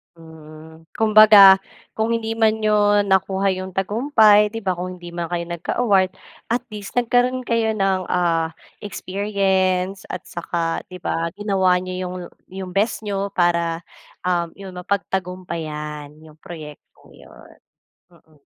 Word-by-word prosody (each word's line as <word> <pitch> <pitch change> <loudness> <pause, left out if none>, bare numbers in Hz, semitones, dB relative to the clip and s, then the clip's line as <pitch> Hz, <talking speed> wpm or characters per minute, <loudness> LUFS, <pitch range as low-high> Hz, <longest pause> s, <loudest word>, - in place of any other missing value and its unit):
Mm, 160 0 -14
kumbaga 210 -3 +8 0.4
kung 220 +1 0
hindi 225 -1 -3
man 220 -1 +2
niyo 205 -1 +3
nakuha 190 0 +1
yung 185 -1 -6
tagumpay 210 0 +4
di 225 -1 -5
ba, 185 -2 0
kung 185 +1 -5
hindi 175 -1 -10
man 170 -1 -4
kayo 170 0 -3
nagka-award. 190 +2 +1 0.4
At 245 +2 -1
least 205 -2 -8
nagkaroon 245 +1 +1
kayo 230 -2 0
ng 195 -2 +1
ah, 165 -2 0 0.3
experience, 195 -2 -1
at 185 - -5
saka 170 -1 -3
di 180 -1 -11
ba 165 0 -1
ginawa 190 -3 +2
niyo 185 0 -6
yung 180 - -6 0.3
yung 190 -1 -7
best 210 +4 0
niyo 200 -1 -2
para 170 -1 +1 0.4
um 175 -2 0
yun 190 -2 -9
mapagtagumpayan 170 -6 -4
yung 155 -1 -16
proyektong 155 -4 -12
yun 65 0 -17 0.6
mm. 155 -3 -25
190 Hz, 135 wpm, -21 LUFS, 170-205 Hz, 0.6 s, kumbaga